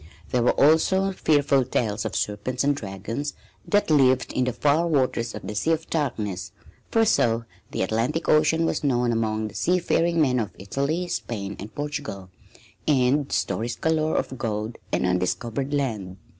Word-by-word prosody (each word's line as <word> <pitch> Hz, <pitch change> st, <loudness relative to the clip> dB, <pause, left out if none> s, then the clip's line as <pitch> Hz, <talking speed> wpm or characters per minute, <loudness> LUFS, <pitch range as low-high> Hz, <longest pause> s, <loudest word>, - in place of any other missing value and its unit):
There 125 Hz, -, +1 dB
were 120 Hz, -, +2 dB
also 190 Hz, +6 st, +4 dB
fearful 145 Hz, -6 st, +2 dB
tales 110 Hz, -4 st, -1 dB
of -, -, -3 dB
serpents 115 Hz, +6 st, -1 dB
and 145 Hz, +1 st, +2 dB
dragons 115 Hz, +6 st, -5 dB, 0.3 s
that 205 Hz, -5 st, +2 dB
lived 130 Hz, -3 st, +3 dB
in 130 Hz, -, +1 dB
the 125 Hz, -, 0 dB
far 150 Hz, +7 st, +2 dB
waters 130 Hz, -6 st, 0 dB
of -, -, -8 dB
the -, -, -4 dB
"Sea 160 Hz, +10 st, +1 dB
of 160 Hz, 0 st, -4 dB
Darkness," 105 Hz, -, -2 dB, 0.4 s
for 225 Hz, 0 st, +3 dB
so 115 Hz, -, +2 dB, 0.2 s
the -, -, -1 dB
Atlantic 115 Hz, +9 st, -1 dB
Ocean 155 Hz, +2 st, +4 dB
was -, -, -1 dB
known 125 Hz, -4 st, +2 dB
among 110 Hz, -1 st, 0 dB
the 105 Hz, -, -10 dB
seafaring 170 Hz, +1 st, +1 dB
men 130 Hz, -5 st, +3 dB
of 105 Hz, -6 st, -4 dB
Italy, 140 Hz, -, -2 dB
Spain 100 Hz, -, -4 dB
and 105 Hz, +3 st, -9 dB
Portugal, 145 Hz, -11 st, -5 dB, 0.6 s
and 140 Hz, 0 st, +2 dB
stories 115 Hz, +1 st, -1 dB
galore 160 Hz, -1 st, 0 dB
of 130 Hz, -, -2 dB
gold 110 Hz, 0 st, -3 dB
and -, -, +1 dB
undiscovered 95 Hz, +9 st, -1 dB
land. 110 Hz, -10 st, -2 dB
130 Hz, 160 wpm, -25 LUFS, 110-150 Hz, 0.6 s, also